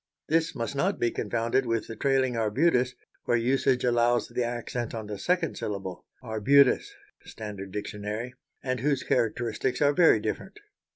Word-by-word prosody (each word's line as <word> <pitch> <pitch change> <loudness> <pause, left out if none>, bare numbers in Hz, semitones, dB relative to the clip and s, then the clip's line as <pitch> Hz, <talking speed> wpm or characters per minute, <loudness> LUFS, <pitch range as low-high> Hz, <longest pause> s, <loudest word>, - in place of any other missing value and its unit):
This 165 0 +1
must 115 +2 -3
not 185 +8 +1
be 120 - +1
confounded 115 +4 0
with 115 -1 0
the 115 - -7
trailing 130 0 +1
arbutus, 125 +3 +2 0.3
where 120 - +2
usage 125 +1 +1
allows 120 0 +2
the 125 - -1
accent 120 0 -4
on 110 -1 -5
the 105 -1 -6
second 175 - 0
syllable 95 -4 -5 0.2
ar_bu_tus 125 - +4 0.4
(Standard 100 -3 -8
Dictionary) 105 +4 -5 0.3
and 130 -1 -1
whose 140 +1 0
characteristics 120 +1 0
are 145 -1 +4
very 165 +2 +5
different. - - -4
120 Hz, 150 wpm, -27 LUFS, 110-135 Hz, 0.4 s, very